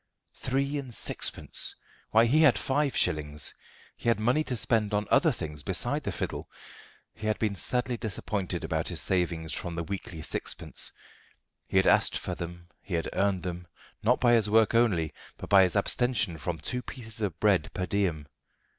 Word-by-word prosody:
Three 140 +2 -1
and 130 -5 -8
sixpence! - - -3 0.3
Why, 110 +1 +5
he 145 +7 +4
had 145 -6 +6
five 140 +1 0
shillings. 75 -2 -1 0.4
He - - -1
had 115 - +3
money 125 +8 +2
to 125 - -2
spend 110 -3 +1
on 105 +1 0
other 150 +3 +5
things 75 - -5
beside - - 0
the - - -1
fiddle. - - -4 0.6
He 110 - -6
had 110 - +1
been 110 -2 0
sadly 125 +6 -1
disappointed 100 -5 -2
about 80 0 -1
his 85 -3 -1
savings 85 -3 0
from 85 -2 -4
the 85 - -2
weekly 85 -2 -6
sixpence. - - -3 0.8
He - - 0
had - - +5
asked - - +4
for - - -4
them; 85 0 -7
he 95 - -4
had 80 - -2
earned 95 -3 +1
them, 90 -1 -5 0.3
not 125 +4 +3
by 120 -1 +4
his 110 -3 +4
work 110 +1 +4
only, 100 -10 +2 0.2
but - - -9
by 100 -1 +8
his 90 0 +3
abstention 100 -5 +2
from 80 +3 -3
two 125 +11 -2
pieces 115 -3 -6
of 90 -5 -2
bread 105 -4 +3
per 90 - -1
diem. 90 -7 0
100 Hz, 180 wpm, -29 LUFS, 85-120 Hz, 0.8 s, by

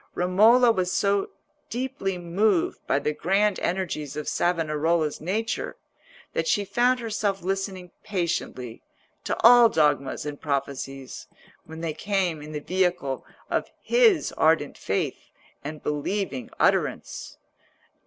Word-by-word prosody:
Romola 220 +7 +5
was 185 -4 -1
so 200 -1 +1 0.4
deeply 245 -6 -3
moved 175 +2 +1
by - - +2
the 150 +1 -1
grand 195 +6 +1
energies 170 -6 -2
of 150 - -4
Savonarola's 160 -2 0
nature, 210 +7 -2 0.6
that - - -1
she 205 - +2
found 250 +5 +2
herself 210 -4 -2
listening 190 -1 -3
patiently 170 - -3 0.4
to - - -1
all 240 0 +8
dogmas 145 - +1
and 145 -1 -6
prophecies, 135 -2 -4 0.4
when 160 +1 -9
they 165 -2 -2
came 180 -2 -1
in 150 +1 -9
the 150 - -3
vehicle 175 -5 -1 0.2
of - - -1
his 460 -8 +3
ardent 155 -2 +3
faith 95 - -3 0.3
and 150 +1 -7
believing 150 -1 -2
utterance. - - 0
180 Hz, 120 wpm, -25 LUFS, 150-205 Hz, 0.6 s, all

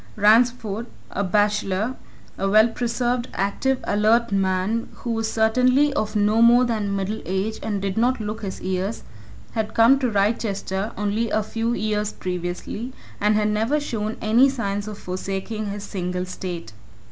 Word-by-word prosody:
Ransford, 225 +1 +3 0.2
a 200 - -1
bachelor, 210 +3 +1 0.4
a 195 - -1
well 215 +3 +6
preserved, 240 +1 -1
active, 250 +7 0
alert 220 +3 +2
man 195 +3 0
who 235 - -5
was 225 -1 -1
certainly 255 +6 +3
of 215 -5 -2
no 210 +2 +3
more 240 +2 +7
than 210 -4 -1
middle 195 +3 -2
age 190 +4 -2
and 205 -2 -2
did 195 +2 -2
not 250 +2 +2
look 215 +1 -4
his 195 -3 -5
years, 190 +3 -2 0.5
had 220 -1 -3
come 235 +4 +6
to 255 -3 +1
Wrychester 205 -1 -1
only 210 +3 0
a 215 +1 +1
few 230 +2 -2
years 210 0 -1
previously, 180 +7 -4 0.3
and 210 +1 +3
had 210 0 +2
never 225 +8 +1
shown 220 -6 -3
any 235 +5 +5
signs 205 -5 -3
of 210 -1 -6
forsaking 195 +4 -4
his 200 0 -5
single 180 -2 -3
state. 175 - -6
215 Hz, 155 wpm, -23 LUFS, 200-230 Hz, 0.5 s, more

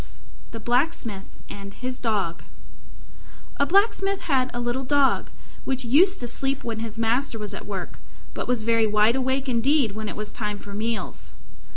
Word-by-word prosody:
THE 230 - -7
BLACKSMITH 240 -4 -1
AND 200 0 -8
HIS 255 +1 -4
DOG 200 -8 -1 1.2
A 280 - +2
Blacksmith 395 +1 +3
had 260 -5 +1
a 240 - -4
little 240 +2 -1
Dog, 280 +1 +3 0.3
which 260 -1 -1
used 360 +11 +5
to 240 - -3
sleep 270 +3 -1
when 225 -2 -3
his 225 -1 -4
master 230 +2 +1
was 210 -1 -5
at - - -7
work, - - -5 0.3
but - - -4
was 245 -3 +1
very 230 0 +3
wide 210 +2 +4
awake 265 +1 0
indeed 255 0 +3
when 215 +1 -4
it - - -5
was 210 0 -5
time 210 -2 -3
for 200 0 -10
meals. 220 +2 -3
240 Hz, 170 wpm, -25 LUFS, 215-270 Hz, 1.2 s, used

